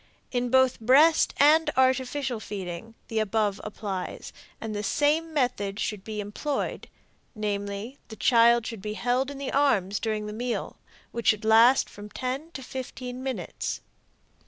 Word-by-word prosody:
In 245 -1 0
both 260 0 +4
breast 290 +8 +5
and 310 +3 +5
artificial 260 -1 +1
feeding 200 +1 -6
the 225 - -1
above 210 -1 0
applies, 200 -3 -5 0.3
and 220 -1 -5
the 205 - -2
same 300 +8 +1
method 240 -8 -1
should 210 -3 -3
be 215 0 -5
employed; 210 +8 -3 0.5
namely, 205 +3 -4
the 220 - -9
child 235 0 +4
should 225 -4 -6
be 210 +1 -4
held 250 +3 0
in 285 - -7
the 275 -1 -4
arms 205 -9 +2
during 215 -2 -2
the 210 - -5
meal, 240 +2 -3 0.3
which 235 - -4
should 215 0 +3
last 230 +4 +6
from 205 0 -11
ten 260 +8 -4
to 265 - -7
fifteen 255 -1 -6
minutes. 265 -1 -4
235 Hz, 150 wpm, -27 LUFS, 210-260 Hz, 0.5 s, last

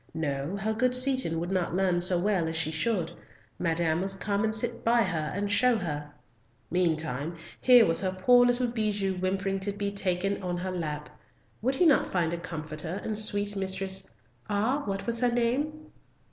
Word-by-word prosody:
No, 150 +3 -2
her 215 +2 -1
good 250 +3 +1
Seaton 255 -10 +2
would 175 +2 -4
not 180 -2 -1
learn 180 -2 +1
so 180 0 +3
well 180 -2 +1
as 160 - -3
she 160 -1 0
should; 170 0 -1 0.5
Madame 165 -1 0
must 195 0 -1
come 200 +1 -1
and 220 0 +1
sit 235 +1 -1
by 235 0 +4
her 160 -6 -2
and 200 +1 -2
show 250 +3 +3
her. 150 -6 -5 0.6
Meantime 160 -3 -1 0.2
here 245 -3 +7
was 165 - +3
her 190 -1 0
poor 245 +7 +5
little 245 +1 +2
Bijou 210 -5 -1
whimpering 195 +1 -1
to 195 +1 -3
be 200 0 -3
taken 195 0 -1
on 180 -1 -3
her 185 +1 -3
lap. 150 -4 -4 0.5
Would 260 +4 0
not 320 -6 +5
he - - -10
find 170 -3 0
a 170 - -3
comforter 160 +1 -5
in 215 - -3
sweet 205 -1 +3
Mistress—ah, 190 - -2
what 195 0 -3
was 235 -1 0
her 245 0 +2
name? 285 +6 -1
195 Hz, 180 wpm, -28 LUFS, 170-220 Hz, 0.6 s, here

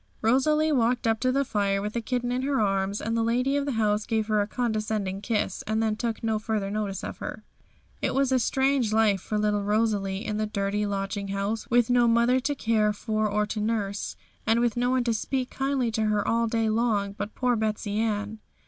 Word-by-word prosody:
Rosalie 300 +7 +3
walked 245 -3 +1
up 225 -1 +2
to 255 - +1
the 275 +2 +1
fire 200 -3 0
with 210 +1 -4
the 235 - -1
kitten 245 +1 -2
in 250 +1 0
her 275 0 0
arms, 195 -1 0
and 225 +1 -2
the 230 - +1
lady 250 +4 +1
of 285 0 0
the 280 - -1
house 215 -1 +1
gave 220 -2 0
her 215 -1 +3
a 205 - -1
condescending 215 -5 -2
kiss, 210 -1 -1
and 220 +1 +1
then 220 -1 +1
took 230 0 -3
no 220 -1 0
further 215 -2 -2
notice 205 -2 -3
of - - -6
her. - - -6 0.6
It - - 0
was 270 -1 +2
a 260 - +4
strange 265 -1 +1
life 215 -3 +3
for 215 - -3
little 210 -1 +1
Rosalie 205 -2 0
in 210 - -2
the 215 0 -1
dirty 205 0 -1
lodging 200 0 -3
house, 200 +3 -3
with 240 0 +3
no 245 -1 +4
mother 235 +2 +4
to 290 +3 -1
care 220 -4 +1
for 215 0 -1
or 210 +1 +1
to 210 +1 -4
nurse, 210 -2 -2 0.3
and 225 +1 +4
with 240 -1 +1
no 245 +1 +1
one 255 -1 +2
to 235 -1 +1
speak 255 +3 -2
kindly 270 -3 0
to 220 0 0
her 210 -1 +1
all 230 0 +2
day 225 0 0
long 215 -3 +1
but 205 +1 -6
poor 250 -1 +1
Betsey 215 -1 -1
Ann. 215 -1 -1
220 Hz, 220 wpm, -26 LUFS, 210-240 Hz, 0.6 s, a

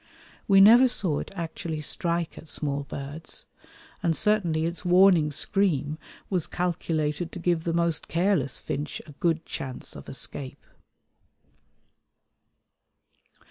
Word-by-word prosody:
We 195 -1 +6
never 235 +6 +8
saw 180 - +3
it - - -6
actually 165 -2 -4
strike 170 +2 -2
at 160 - -12
small 145 -2 -3
birds, 145 +4 -7 0.6
and 165 -1 +1
certainly 175 -7 +2
its 170 0 -4
warning 180 -4 +5
scream 155 -3 0 0.3
was 180 -5 -1
calculated 165 -2 -2
to - - -8
give 170 -2 0
the 165 - 0
most 170 -1 0
careless 170 -6 +1
finch 145 +1 -4
a 155 - -12
good 165 +2 -1
chance 130 -5 -6
of - - -10
escape. 130 -2 -4
165 Hz, 120 wpm, -26 LUFS, 150-180 Hz, 0.6 s, never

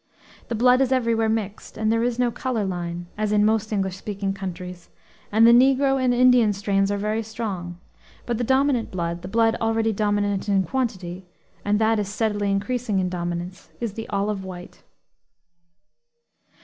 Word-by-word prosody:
The 235 - -2
blood 250 +3 +4
is 265 -1 +1
everywhere 230 -3 +2
mixed; 215 -2 -3
there 220 +1 +1
is 240 0 0
no 245 -1 +1
color 235 -4 -2
line, 175 -2 -4
as 215 -1 0
in 210 0 +4
most 220 0 +1
English 190 -3 -1
speaking 195 -1 -4
countries, 180 -2 -7 0.4
and 220 +2 +5
the 235 - +8
negro 270 +2 +4
and 250 - +3
Indian 245 -3 +5
strains 195 0 0
are 205 - 0
very 215 +2 -1
strong; 205 -6 -5 0.5
but 240 -2 -2
the - - 0
dominant 265 -1 +2
blood, 170 -1 -3
the 180 - -7
blood 225 +2 +2
already 225 0 +1
dominant 205 -1 0
in 195 -1 +3
quantity, 190 -8 -3 0.4
and 205 +1 +1
that 220 0 +2
is 205 -2 -2
steadily 205 -1 -1
increasing 210 +2 -1
its 185 -1 0
dominance, 175 +1 -5
is 230 -4 -3
the 225 +1 -7
olive 200 -1 -1
white. 180 -1 -10
210 Hz, 165 wpm, -23 LUFS, 195-230 Hz, 0.5 s, the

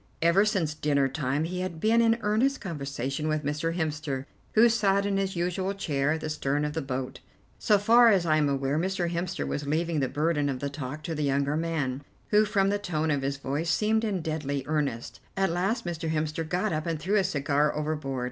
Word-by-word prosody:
Ever 170 +5 +4
since 185 -8 0
dinner 145 -2 +1
time 135 +1 -1
he 180 +3 -3
had 180 -3 -4
been 225 +5 +3
in 230 0 +3
earnest 225 +7 +1
conversation 140 - -4
with 155 -1 0
Mr. 150 +3 -1
Hemster, 150 -5 -2 0.3
who 225 +2 +7
sat 200 -4 +2
in 200 -1 0
his 195 -1 -1
usual 180 +3 -1
chair 150 -6 0
at 160 - -4
the 155 - -3
stern 145 0 -1
of 150 - -3
the 160 - -2
boat. 130 -1 -4 0.4
So 210 - +4
far 230 +4 +6
as 190 -5 +3
I 155 -1 +3
am 150 -2 +2
aware, 140 +2 0
Mr. 180 -1 -1
Hemster 175 +1 -2
was 145 0 -3
leaving 160 +1 0
the 135 -2 0
burden 150 0 0
of 135 - -2
the 140 +1 -3
talk 145 +1 -6
to 165 - -3
the 150 - -3
younger 140 0 +1
man, 150 -5 -2 0.3
who, 210 0 +5
from 200 -2 +2
the 205 0 0
tone 160 -5 -1
of 145 -2 0
his 135 +1 -2
voice, 140 +5 -2
seemed 215 +7 +2
in 195 -6 -1
deadly 145 -3 -2
earnest. 145 -6 -2 0.2
At 195 -2 +2
last 190 +7 -1
Mr. 165 -2 -3
Hemster 155 0 -2
got 185 +1 0
up 155 +2 -2
and 165 -2 -1
threw 190 +7 +1
his 195 - +2
cigar 145 +1 +1
overboard. 150 -3 -2
160 Hz, 215 wpm, -27 LUFS, 145-190 Hz, 0.4 s, who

